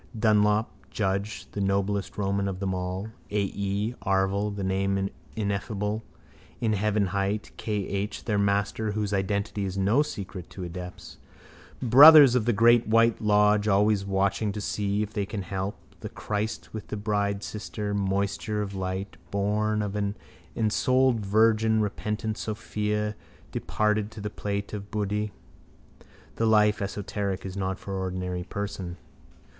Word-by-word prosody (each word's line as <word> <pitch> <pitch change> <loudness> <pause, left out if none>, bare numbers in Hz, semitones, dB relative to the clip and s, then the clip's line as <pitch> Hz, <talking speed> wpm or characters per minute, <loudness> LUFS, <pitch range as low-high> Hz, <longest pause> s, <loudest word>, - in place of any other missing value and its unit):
Dunlop, 105 0 +3 0.2
Judge, 100 +1 -2
the 100 - -3
noblest 100 +1 0
Roman 100 -1 0
of 95 -1 -4
them 95 -1 -1
all, 90 +3 -3 0.2
A.E., 100 +2 -1
Arval, 95 +2 +1
the 100 - -4
Name 95 +1 0 0.2
Ineffable, 105 0 -2 0.6
in 110 -2 +1
heaven 105 0 +1
hight: 100 +3 -2
K.H., 100 -1 -3
their 105 -3 +1
master, 100 +1 0
whose 105 -1 -2
identity 100 +1 -1
is 95 0 -3
no 100 +8 +3
secret 95 - -5
to 95 - -7
adepts. 90 +1 -8 0.7
Brothers 140 +2 +10
of 125 -4 +2
the 120 - +3
great 120 +2 +5
white 115 +1 +3
lodge 105 0 +4
always 105 0 +3
watching 100 +2 0
to 105 - -4
see 105 0 -1
if 105 0 -7
they 100 -2 -1
can 100 -2 -4
help. 95 +2 -3 0.2
The - - -6
Christ 105 +1 -4
with 110 -2 -6
the 105 - -4
bridesister, 105 0 -2
moisture 100 +1 -1
of 100 -1 -6
light, 95 +1 -4
born 105 +1 0
of 100 0 -4
an 100 0 -1 0.4
ensouled 125 +3 +2
virgin, 110 +2 +3
repentant 105 +1 -2
sophia, 105 -1 -2 0.4
departed 105 -1 0
to 110 - -11
the 105 0 -4
plane 100 -1 -2
of 100 -1 -6
buddhi. 105 0 -1 1.1
The 115 - +2
life 105 -1 +4
esoteric 100 -1 -3
is 95 0 -6
not 95 -1 -2
for 100 - -7
ordinary 90 -1 -3
person. 100 -3 -5
105 Hz, 140 wpm, -27 LUFS, 100-105 Hz, 1.1 s, Brothers